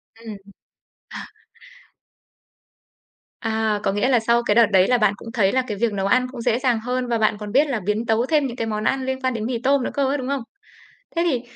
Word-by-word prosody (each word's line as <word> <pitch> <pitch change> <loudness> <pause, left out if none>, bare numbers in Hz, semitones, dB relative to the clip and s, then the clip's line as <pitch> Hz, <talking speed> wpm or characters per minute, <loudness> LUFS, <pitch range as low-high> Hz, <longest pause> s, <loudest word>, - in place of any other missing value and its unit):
Ừm. 225 -2 -9 0.7
Ờ. - - -7 2.2
À, 220 -2 0
có - - +1
nghĩa 205 +6 0
là 245 - +4
sau 235 +1 +1
cái 210 - +1
đợt 235 -1 +7
đấy 190 -1 +4
là 250 - +3
bạn 215 -3 +2
cũng 225 - -10
thấy 205 -6 +2
là 260 - +2
cái 210 - -4
việc 230 -1 0
nấu 195 -1 -2
ăn 255 +5 +2
cũng 245 - -7
dễ 230 +1 +1
dàng 250 -4 +1
hơn 250 +2 -3
và 235 -1 0
bạn 215 -1 +1
còn 210 -1 -7
biết 285 +5 +3
là 250 -6 -2
biến 210 +3 -1
tấu 225 +2 +1
thêm 295 0 +1
những 240 - -7
cái 225 -3 -3
món 215 0 -3
ăn 265 -1 0
liên 265 0 -3
quan 260 -1 0
đến 220 -1 -4
mì 245 0 -2
tôm 275 -1 +2
nữa - - -2
cơ 280 -2 0
ấy, 280 +2 0
đúng 255 -1 -5
không? 280 -1 -1 0.8
Thế 335 - +2
thì, 250 -3 -1
235 Hz, 245 wpm, -22 LUFS, 215-260 Hz, 2.2 s, đợt